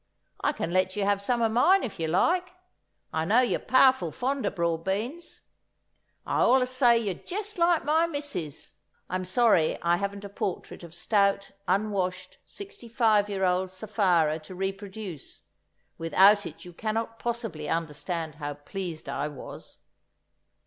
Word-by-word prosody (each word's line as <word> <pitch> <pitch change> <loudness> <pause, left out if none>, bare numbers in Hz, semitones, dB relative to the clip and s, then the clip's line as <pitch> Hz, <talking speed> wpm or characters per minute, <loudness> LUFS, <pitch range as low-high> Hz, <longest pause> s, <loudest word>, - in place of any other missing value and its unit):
I - - +3
can 170 - -4
let 185 0 +2
you 205 - -1
have 200 0 +1
some 235 +3 0
o' - - +5
mine 300 - +4
if 215 -7 -5
you 160 - -1
like. 355 - +1 0.6
I 160 - 0
know 215 +9 +4
you're 250 - +1
powerful 260 0 +4
fond 265 +2 -1
o' - - +3
broad 170 -3 -1
beans. 235 - -4 0.8
I - - 0
allus 255 0 +4
say 245 -2 +5
you're 210 -5 -1
jest 410 - -5
like 340 -2 +3
my 320 +3 +3
missus." 285 - -4 0.4
(I'm 185 0 -2
sorry 185 -4 +3
I 170 0 +3
haven't 200 +1 -4
a - - -4
portrait 195 -2 -4
of 170 -1 -11
stout, 200 +1 +1 0.2
unwashed, 185 -2 -1
sixty 400 - -9
five 220 -4 +3
year 195 -1 -2
old 185 +1 +1
Sapphira 185 -6 +1
to 160 +4 -11
reproduce; 195 -3 -6 0.6
without 195 +5 +5
it - - -11
you 175 - -10
cannot 225 +3 -3
possibly 225 -11 -3
understand 165 0 -3
how 145 0 -3
pleased 170 +2 -6
I 145 - -2
was!) 145 -3 -10
200 Hz, 155 wpm, -27 LUFS, 175-240 Hz, 0.8 s, o